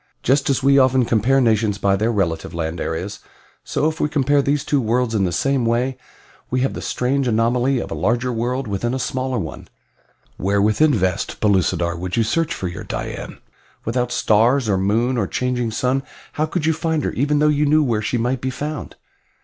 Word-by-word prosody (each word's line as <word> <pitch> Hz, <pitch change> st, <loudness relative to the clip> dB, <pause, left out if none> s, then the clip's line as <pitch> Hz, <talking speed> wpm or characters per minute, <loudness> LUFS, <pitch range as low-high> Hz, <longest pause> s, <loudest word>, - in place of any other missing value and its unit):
Just 135 Hz, +3 st, +2 dB
as 135 Hz, -1 st, +1 dB
we 140 Hz, 0 st, +5 dB
often 130 Hz, -1 st, +4 dB
compare 120 Hz, +5 st, +2 dB
nations 110 Hz, -4 st, +2 dB
by 100 Hz, -1 st, +2 dB
their 110 Hz, +4 st, 0 dB
relative 85 Hz, -5 st, -2 dB
land 80 Hz, 0 st, -3 dB
areas, 90 Hz, +5 st, -4 dB, 0.4 s
so 150 Hz, -, 0 dB
if 160 Hz, 0 st, -3 dB
we 150 Hz, -, +1 dB
compare 145 Hz, -1 st, +2 dB
these 140 Hz, +1 st, 0 dB
two 145 Hz, -3 st, +1 dB
worlds 120 Hz, +1 st, 0 dB
in 100 Hz, -3 st, +2 dB
the 90 Hz, -, -1 dB
same 135 Hz, +8 st, +1 dB
way 120 Hz, +3 st, 0 dB, 0.5 s
we 130 Hz, 0 st, 0 dB
have 135 Hz, -, 0 dB
the -, -, -6 dB
strange 130 Hz, +2 st, 0 dB
anomaly 120 Hz, +3 st, +2 dB
of -, -, -4 dB
a -, -, -1 dB
larger 120 Hz, +2 st, 0 dB
world 125 Hz, +3 st, -2 dB
within 115 Hz, +5 st, -2 dB
a -, -, -1 dB
smaller 130 Hz, 0 st, -2 dB
one! 80 Hz, -8 st, -6 dB, 0.7 s
"Where 100 Hz, +2 st, 0 dB
within 110 Hz, +10 st, +3 dB
vast 95 Hz, -7 st, -1 dB
Pellucidar 90 Hz, -4 st, +1 dB
would 90 Hz, +3 st, -4 dB
you 115 Hz, -, +4 dB
search 165 Hz, +8 st, 0 dB
for 125 Hz, -, -3 dB
your 85 Hz, -, -6 dB
Dian? -, -, -5 dB, 0.5 s
Without 125 Hz, +2 st, -1 dB
stars, 115 Hz, +5 st, +3 dB
or 95 Hz, -3 st, +1 dB
moon, 115 Hz, +6 st, +1 dB
or 100 Hz, -, 0 dB
changing 125 Hz, 0 st, -1 dB
sun 125 Hz, +4 st, 0 dB, 0.3 s
how 155 Hz, +1 st, 0 dB
could 160 Hz, 0 st, -2 dB
you 160 Hz, -, +3 dB
find 160 Hz, -1 st, -1 dB
her -, -, -1 dB
even 145 Hz, +4 st, 0 dB
though 150 Hz, +1 st, +3 dB
you 150 Hz, 0 st, +2 dB
knew 155 Hz, +1 st, +4 dB
where 115 Hz, -6 st, 0 dB
she 120 Hz, -, -1 dB
might 125 Hz, +2 st, -1 dB
be 130 Hz, -, -1 dB
found?" 145 Hz, +3 st, -5 dB
125 Hz, 205 wpm, -20 LUFS, 105-135 Hz, 0.7 s, we